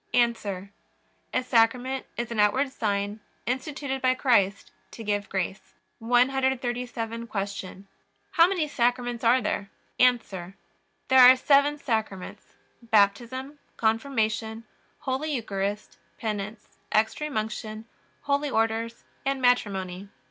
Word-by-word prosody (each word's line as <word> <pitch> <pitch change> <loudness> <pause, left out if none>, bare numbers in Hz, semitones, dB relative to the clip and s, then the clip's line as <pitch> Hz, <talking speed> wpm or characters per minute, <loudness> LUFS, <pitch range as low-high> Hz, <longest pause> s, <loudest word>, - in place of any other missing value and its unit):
A. 205 -5 0 0.6
A - - 0
Sacrament 250 +2 +2
is 235 0 -3
an 230 - -3
outward 260 +7 +3
sign 205 -3 -2 0.3
instituted 265 +2 -3
by 255 0 +3
Christ 205 -7 +2 0.2
to 230 - -9
give 205 -1 -1
grace. 190 +1 -4 0.2
137. 245 -1 0
Q. 195 -2 -5 0.5
How 335 0 +6
many 360 -5 0
Sacraments 245 -3 0
are 240 +1 +4
there? 200 -1 -2 0.3
A. 250 -1 +6 0.9
There 260 -1 +6
are 255 0 +10
seven 285 +2 +3
Sacraments: 220 -8 -3 0.4
Baptism, 235 +6 +1 0.2
Confirmation, 220 -1 0 0.4
Holy 290 +2 -2
Eucharist, 205 -3 -3 0.2
Penance, 210 -1 -4 0.2
Extreme 220 +6 0
Unction, 215 0 -4 0.4
Holy 285 +1 0
Orders, 225 0 -1 0.2
and 275 0 0
Matrimony. 200 -6 0
235 Hz, 105 wpm, -26 LUFS, 210-260 Hz, 0.9 s, are